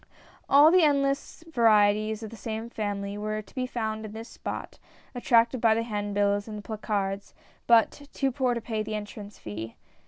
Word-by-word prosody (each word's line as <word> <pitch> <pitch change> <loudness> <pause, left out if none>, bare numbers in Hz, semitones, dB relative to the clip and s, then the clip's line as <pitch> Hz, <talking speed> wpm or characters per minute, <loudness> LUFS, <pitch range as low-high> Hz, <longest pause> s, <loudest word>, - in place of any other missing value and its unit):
All 290 +3 +8
the 365 +1 +6
endless 280 0 +1
varieties 215 -3 +3
of 220 - -7
the - - -8
same 225 +1 -5
family 205 -2 -3
were 215 0 -3
to - - -21
be 255 -1 -2
found 220 -3 -3
in 215 -1 -7
this 225 +1 -8
spot, - - -7 0.3
attracted 240 0 +3
by 225 -2 +5
the 230 - 0
hand 205 -3 -3
bills 205 0 +1
and 215 -1 -6
the 205 - -8
placards, 200 -2 -3 0.3
but 235 +5 +3
too 270 -1 0
poor 255 -1 0
to 235 - -3
pay 220 -1 -3
the 215 0 -4
entrance 210 0 -7
fee. 110 +2 -7
220 Hz, 185 wpm, -27 LUFS, 205-240 Hz, 0.3 s, All